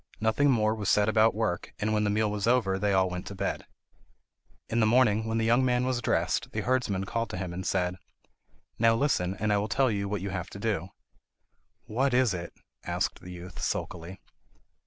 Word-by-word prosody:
Nothing 110 +6 +2
more 110 -4 +3
was 105 -3 -2
said 105 0 +4
about 110 0 +4
work, 110 -5 -2
and 110 +1 -1
when 105 0 +1
the - - +1
meal 105 0 +1
was 105 +1 -2
over 105 -6 +2
they 105 0 +1
all 95 -1 +3
went 90 0 -5
to 100 - -7
bed. - - -3 1.0
In 115 - 0
the 110 - +4
morning, 110 -2 +3
when 110 0 -1
the 115 - +1
young 120 +3 +4
man 125 -1 +2
was 130 -1 0
dressed, - - 0
the - - -1
herdsman 120 -7 0
called 115 +2 -2
to - - -5
him 90 -1 -4
and 90 +2 -5
said: 90 -1 0 0.8
"Now 115 0 +5
listen, 100 -9 +1
and 105 +1 0
I 100 - +3
will 105 - -1
tell 130 +1 +2
you 100 -1 -2
what 105 -2 -2
you 100 0 -4
have 90 -2 -4
to 100 - -9
do." 100 -5 -1 0.9
"What 130 +3 0
is 125 -4 +3
it?" 85 -1 -5 0.3
asked - - -2
the 90 - -10
youth, 90 0 -9
sulkily. 90 +3 -4
105 Hz, 210 wpm, -28 LUFS, 95-115 Hz, 1.0 s, Now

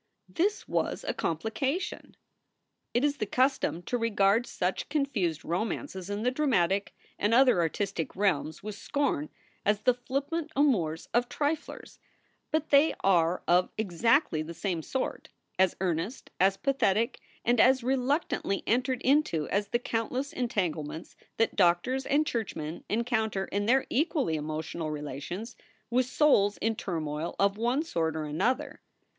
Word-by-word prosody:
This 400 +5 -1
was - - -1
a - - 0
complication! 260 - -3 0.7
It 240 - +1
is 290 -1 0
the 215 - -2
custom 255 -8 +1
to 245 +7 -2
regard 225 +1 +2
such 180 +1 -2
confused 240 - -1
romances 190 - -3
in 205 +1 -3
the 250 - +2
dramatic 205 - +1 0.2
and 210 +3 +2
other 255 -6 +5
artistic 170 +1 -2
realms 170 -5 0
with 215 0 -5
scorn 200 - -1 0.3
as 210 0 +2
the 250 +3 +4
flippant 280 +6 -3
amours 185 - +1
of 240 +1 +2
triflers; 300 +1 -3 0.5
but 315 0 -1
they 285 +3 +5
are 175 -2 +3
of 180 +1 +4
exactly 220 - +2
the 165 +2 -7
same 170 -1 -2
sort, 265 - -3 0.3
as 190 -1 +4
earnest, 180 +6 -2
as 195 +1 +4
pathetic 235 -4 +1 0.3
and 240 0 +3
as 255 +1 +5
reluctantly 260 - 0
entered 250 +2 0
into 265 - +2
as 200 +1 0
the 240 - +1
countless 245 +4 -2
entanglements 175 - -3 0.2
that 225 - +1
doctors 195 +9 +2
and 300 +2 +3
churchmen 175 - -4
encounter 220 -3 0
in 205 +1 -2
their 260 +3 +4
equally 285 - +1
emotional 155 +1 -4
relations 150 - -5 0.4
with 250 +1 +2
souls 210 -8 +3
in 225 0 0
turmoil 160 -4 -3
of 200 0 +2
one 240 +7 +1
sort 160 - -1
or 155 - -2
another. 250 - -1
215 Hz, 140 wpm, -29 LUFS, 175-260 Hz, 0.7 s, other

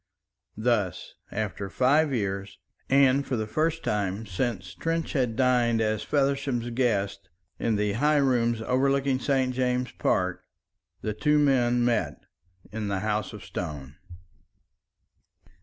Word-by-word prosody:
Thus, 110 -6 -1 0.2
after 100 -1 -3
five 140 +7 +3
years, 100 -4 -3 0.3
and 135 0 +4
for 135 - -2
the 110 -2 -1
first 160 +7 -1
time 105 +1 -1
since 95 -2 -3
Trench 165 0 -2
had 125 -6 0
dined 120 -2 +3
as 110 -1 0
Feversham's 135 -4 0
guest 105 -5 -1 0.3
in 115 - +1
the 105 -1 0
high 150 +7 +2
rooms 120 -4 +2
overlooking 135 +1 +1
St. 130 -2 +1
James's 125 -1 -1
Park, 90 -1 0 0.6
the 105 - -1
two 150 +8 +2
men 125 -4 +3
met 90 - 0 0.5
in 105 0 -3
the 100 -2 -1
House 105 0 -1
of 105 - -10
Stone. 75 -4 -6
120 Hz, 125 wpm, -27 LUFS, 105-135 Hz, 0.6 s, and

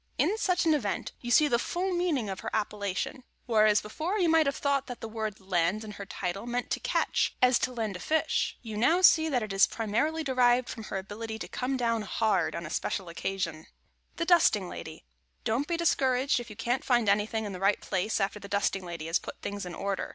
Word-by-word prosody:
In 410 - +2
such 360 -4 +1
an 320 - +4
event 235 -9 -2
you 240 - -5
see 300 +5 +5
the 235 -4 +2
full 365 +7 -2
meaning 340 -10 0
of 190 -1 -4
her 225 - -4
appellation. 210 +3 -2 0.2
Whereas, 215 -3 +4
before 320 - -3
you 355 -5 +2
may 325 0 +5
have 280 - 0
thought 280 -1 0
that 245 -2 -7
the 225 - -6
word 220 -2 -4
"land" 190 +2 0
in 215 - -7
her 200 -1 -8
title 195 +5 -4
meant 245 0 -3
to - - 0
catch, - - 0
as 250 -1 +5
to - - -1
land 220 -5 -3
a - - -6
fish, 315 - 0
you 220 -3 -6
now 325 +11 +3
see 320 -3 +6
that 250 -6 +1
it 210 -2 -4
is 195 - +5
primarily 235 +9 -1
derived 250 -2 +3
from 225 -3 -6
her 195 - -4
ability 220 +3 -6
to - - -6
come 260 +1 -2
down 230 -2 0
hard 215 +1 0
on 170 0 -4
a 155 - -7
special 190 -4 -2
occasion. 175 0 -2
[Sidenote: 155 - -16 0.5
THE 335 - -2
DUSTING 315 - +4
LADY] 160 -1 -8 0.4
Don't 255 +6 0
be 340 - -1
discouraged 265 -6 +2
if 240 - -8
you 215 - -9
can't 245 +4 -1
find 240 -4 +2
anything 210 +2 +1
in 205 - -4
the 185 - -6
right 195 +2 +2
place 195 +4 -1
after 200 +1 -1
the 200 - -9
dusting 195 -1 0
lady 170 -3 -6
has 165 +2 +1
put - - -9
things 200 -2 -4
in 175 - -7
order. 195 -1 -2
220 Hz, 230 wpm, -29 LUFS, 200-265 Hz, 0.5 s, see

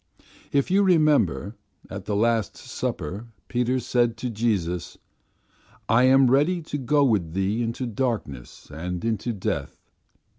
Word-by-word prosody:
"If 140 +5 +1
you 195 +2 +4
remember 150 - +2 0.3
at - - -7
the 105 - -2
Last 115 -1 +1
Supper 100 +10 -5 0.2
Peter 125 +1 0
said 120 -1 +1
to 125 +1 -4
Jesus, 100 -7 -1 0.9
'I 115 +3 +4
am 130 -1 +5
ready 150 +7 +3
to 145 -1 -4
go 145 +3 +2
with 100 -11 +1
Thee 95 +5 0
into 115 +2 -2
darkness 110 - -4
and 90 +5 -4
unto 115 +1 -1
death. 100 -5 -3
115 Hz, 135 wpm, -25 LUFS, 100-130 Hz, 0.9 s, am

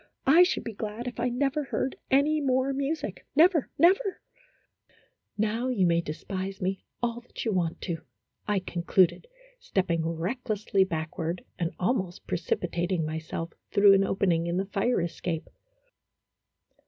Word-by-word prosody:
I 310 +6 +7
should 360 - +3
be 230 - -5
glad 215 +3 -5
if 245 - -6
I 245 +1 +1
never 275 +4 0
heard 265 0 -2
any 295 +3 +3
more 260 0 +1
music 280 +4 -3
never 325 -1 +5
never! 380 +4 +4 1.2
Now 220 +4 0
you 230 -8 +2
may 170 -1 +3
despise 190 +5 -5
me 190 +1 -2 0.2
all 240 0 -1
that 245 - -8
you 225 - +1
want 175 -4 -1
to," 165 -4 -3 0.5
I 205 -2 +1
concluded, 180 - +1 0.3
stepping 185 - 0
recklessly 200 +3 0
backward, 160 0 -3
and 170 -2 0
almost 185 -3 -1
precipitating 175 0 -1
myself 160 +1 -4 0.2
through 200 0 +6
an 195 0 +5
opening 180 -4 +1
in 170 +1 -1
the 190 - 0
fire 205 +3 +1
escape. 170 -1 -3
195 Hz, 140 wpm, -28 LUFS, 175-255 Hz, 1.2 s, I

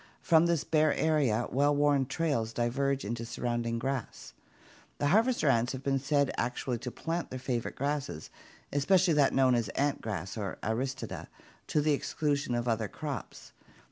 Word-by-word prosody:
From 165 0 +5
this 170 -3 +1
bare 155 -1 +2
area 140 -8 +2
well 145 +2 +3
worn 145 -2 +3
trails 135 -7 -1
diverge 135 +3 0
into 115 +2 -3
the 115 - -6
surrounding 120 0 -2
grass. 125 - -4 0.6
The 145 - +1
harvester 225 - +3
ants 120 -1 +2
have 130 0 -6
been 135 -1 +1
said 140 0 +1
actually 125 0 -2
to 125 - -5
plant 165 +6 -3
their 130 - -5
favorite 125 -2 -3
grasses, 140 - -3 0.4
especially 175 +5 +3
that 145 -2 +4
known 130 -1 +4
as 115 -4 +1
ant 145 0 0
rice 95 -2 -4
or 100 -2 -4
Aristida, 130 +5 -3 0.4
to 150 - +1
the 150 0 +2
exclusion 145 -2 -1
of 120 +1 -1
other 110 -2 0
crops. 140 0 -7
135 Hz, 165 wpm, -30 LUFS, 120-145 Hz, 0.6 s, From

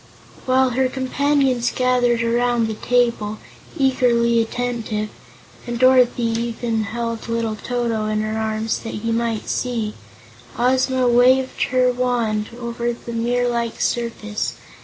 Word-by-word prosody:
While 260 0 +3
her 260 +1 +1
companions 265 -1 +1
gathered 245 -2 +2
around 240 0 +1
the 220 - -2
table, 235 -2 0 0.4
eagerly 235 -3 +3
attentive 225 -2 -3 0.6
and 240 0 -3
Dorothy 255 -1 +4
even 230 -1 -1
held 230 +1 -4
little 230 -1 -1
Toto 230 -1 -2
in 215 0 0
her 215 0 -2
arms 220 0 -1
that 225 - -6
he 230 - 0
might 230 -1 -1
see 230 -4 -2 0.6
Ozma 255 +1 +2
waved 255 +2 +3
her 255 0 +2
wand 235 -4 -1
over 235 0 -2
the 235 0 -9
mirror 245 +2 0
like 235 -1 -2
surface. 225 -3 -2
235 Hz, 125 wpm, -21 LUFS, 225-250 Hz, 0.6 s, Dorothy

